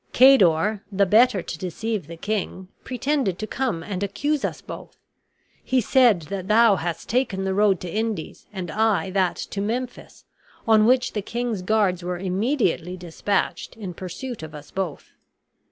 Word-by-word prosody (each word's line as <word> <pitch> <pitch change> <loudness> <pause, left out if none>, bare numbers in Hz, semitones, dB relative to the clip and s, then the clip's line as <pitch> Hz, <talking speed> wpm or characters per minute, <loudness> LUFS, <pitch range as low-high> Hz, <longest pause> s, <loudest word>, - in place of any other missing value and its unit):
Cador, 210 -6 +5
the 200 0 +3
better 215 -1 +4
to 165 - -6
deceive 190 0 -3
the 165 0 -9
king, 190 -1 -3
pretended 260 - -1
to 215 - -4
come 225 -8 -2
and 190 -1 -4
accuse 285 +9 -1
us - - -2
both. - - -10 0.7
He 260 - +2
said 240 - +4
that 190 +3 -5
thou 220 -1 +5
hadst 170 0 -4
taken 225 -5 0
the 190 0 0
road 200 -2 +3
to 180 - -5
the 170 - -7
Indies, 220 -6 -3
and 185 -5 -5
I 205 -4 +1
that 185 -2 +1
to 200 - -5
Memphis, 240 +4 -4 0.4
on 220 -1 +5
which 255 0 +3
the 210 - -1
king's 235 -1 -3
guards 190 -2 +1
were 180 0 -3
immediately 185 - 0
dispatched 180 +6 -2
in 195 -5 -6
pursuit 190 +7 -6
of 155 -1 -8
us 150 0 -11
both. 185 -6 -4
200 Hz, 165 wpm, -24 LUFS, 180-230 Hz, 0.7 s, Cador